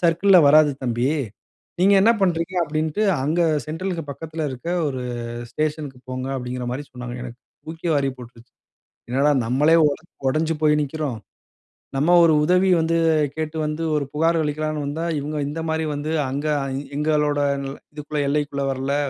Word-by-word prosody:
சர்க்கிள்ல 175 +2 +5
வராது 150 0 +6
தம்பி. 120 +1 0 0.7
நீங்க 200 +2 +5
என்ன 230 +2 +6
பண்றீங்க" 175 0 0
அப்பிடின்ட்டு, 155 +6 -1 0.2
"அங்க 160 +4 +1 0.2
அ - - -5
சென்ட்ரல்க்கு 165 -1 -4
பக்கத்துல 160 +1 -5
இருக்க 130 +7 -8 0.2
ஒரு 130 -2 -4 0.5
ஸ்டேஷன் 155 -1 -2
க்கு 125 - -19
போங்க" 130 +1 -4
அப்பிடிங்கிறமாரி 125 +2 -4
சொன்னாங்க. 125 -1 -7
எனக்கு 125 0 -9 0.3
தூக்கி 165 +2 -5
வாரி 140 -2 +1
போட்ருச்சு. 120 0 -14 0.6
என்னடா! 140 +3 +3 0.2
நம்மளே 145 +7 +3 0.2
ஒடு 145 +2 -4 0.3
ஒடஞ்சு 160 +3 0
போய் 150 0 +4
நிக்கிறோம். 145 -5 -3 0.8
நம்ம 155 +6 +3
ஒரு 160 -2 +5
உதவி 180 +3 +3
வந்து 165 +1 +1 0.4
கேட்டு 160 0 -4
வந்து 150 +2 -3
ஒரு 145 -2 0
புகார் 165 +2 +2
அளிக்கலான்னு 155 0 -2
வந்தா, 155 +4 -3 0.2
இவுங்க 150 +2 -4
இந்தமாரி 160 +1 -2
வந்து 150 +2 -3 0.2
அங்கே 145 +3 -1 0.4
எங்களோட 150 -1 +1 0.5
இதுக்குள்ள 150 0 -3
எல்லைக்குள்ள 145 -1 -1
வரல, 135 +2 -2
150 Hz, 145 wpm, -22 LUFS, 140-160 Hz, 0.8 s, வராது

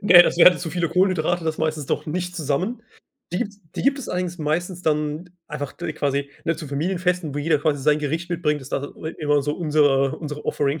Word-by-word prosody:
Ne, 175 -3 +9
das - - 0
wären 180 0 +7
zu 165 -3 -4
viele 170 -2 0
Kohlenhydrate, 175 -2 +1
das 160 -1 -1
meistens 155 -3 -1
doch - - -2
nicht 180 +3 -3
zusammen. 165 - -1 0.5
Die 180 - 0
gibt's 205 0 -4
die - - -3
gibt 275 +1 +2
es 275 - -6
allerdings 180 -1 -2
meistens 175 +4 -2
dann 150 +2 -1 0.2
einfach 145 -2 -5
d 170 -2 -5
quasi, 140 -1 -1
ne, 165 0 0
zu 155 -4 -7
Familienfesten, 175 +1 -1
wo - - -2
jeder 150 0 +2
quasi 145 -3 0
sein 150 +1 +4
Gericht 160 +4 -3
mitbringt 150 -4 0
ist 130 - -11
da, 140 - -1
äh, 160 +2 -7
immer 145 -2 +2
so 145 +1 -1
unsere 145 -5 +2
unsere 150 -2 -6
Offering. 145 +1 0
155 Hz, 215 wpm, -23 LUFS, 150-175 Hz, 0.5 s, Ne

